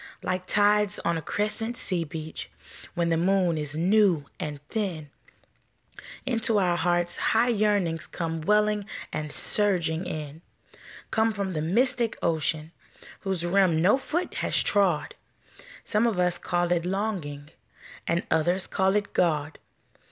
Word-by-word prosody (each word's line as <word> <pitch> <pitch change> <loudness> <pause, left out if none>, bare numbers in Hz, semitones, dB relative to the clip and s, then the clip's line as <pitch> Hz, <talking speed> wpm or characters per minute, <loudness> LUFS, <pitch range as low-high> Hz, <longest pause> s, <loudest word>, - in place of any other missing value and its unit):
Like 185 0 -2
tides 205 +1 +3
on 170 - -1
a 165 - -2
crescent 215 +7 -2
sea 180 -4 -1
beach, 155 +1 -7 0.5
When 170 -1 +1
the 165 - +2
moon 180 0 +2
is 150 -1 -4
new 180 -2 +3
and 150 -2 -4
thin, 175 -10 -3 1.1
Into 230 -3 +1
our 180 -3 +2
hearts 175 +1 0
high 235 +2 +2
yearnings 200 -7 +1
Come 165 -2 -4
welling 210 +3 +2 0.3
and 150 -1 -3
surging 180 -5 0
in 155 0 -6 0.7
Come 220 0 +2
from 200 -2 -3
the 155 - -2
mystic 235 - +2
ocean, 160 -1 0 0.5
Whose 190 -4 -2
rim 180 -2 +3
no 200 +7 +6
foot 310 +6 -3
has - - +1
trod, 185 -7 +2 0.7
Some 215 +2 +2
of 220 -5 -1
us 180 -1 +1
call 175 0 0
it 170 -1 +2
Longing, 175 -7 -3 0.6
And 170 +1 +1
others 175 +4 +2
call 190 0 +1
it 205 -1 -1
God. 155 -3 0
180 Hz, 135 wpm, -26 LUFS, 160-210 Hz, 1.1 s, no